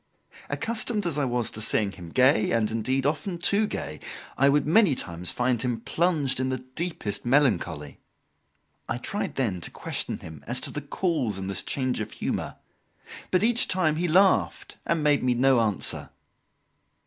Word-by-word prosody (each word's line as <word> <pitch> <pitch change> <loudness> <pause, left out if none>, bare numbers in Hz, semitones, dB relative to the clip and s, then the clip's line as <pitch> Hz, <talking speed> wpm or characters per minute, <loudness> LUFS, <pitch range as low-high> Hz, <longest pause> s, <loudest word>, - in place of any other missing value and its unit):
Accustomed 230 -2 -1
as 155 -4 -1
I 145 - +1
was 120 -2 -1
to 110 - -6
seeing 105 -2 +1
him 90 -4 -10
gay 130 - +3
and, 110 -2 +1
indeed, 130 +4 -1
often 170 +5 -1
too 200 +5 +3
gay, - - -5 0.4
I 140 +1 +4
would 145 +1 +2
many 170 -1 +4
times 90 -4 -1
find 125 -1 +1
him 125 -3 -1
plunged 145 +1 +1
in 130 0 0
the 130 - -1
deepest 130 - -4
melancholy. 120 - +1 0.9
I - - -1
tried 200 +9 -4
then 105 -10 -1
to - - -5
question - - -3
him 80 -3 -11
as 120 +2 0
to - - -3
the 150 - -5
cause 145 - -1
of 95 0 -5
this 100 - -2
change 130 -3 -1
of 105 - -6
humour, - - -3 0.7
but 185 +2 +2
each 235 +1 +4
time 160 -5 +1
he 175 +2 0
laughed 190 +4 +2
and 165 -2 +1
made 145 -1 +3
me 125 -1 +1
no 130 0 +4
answer. 105 -5 -1
130 Hz, 170 wpm, -26 LUFS, 115-170 Hz, 0.9 s, I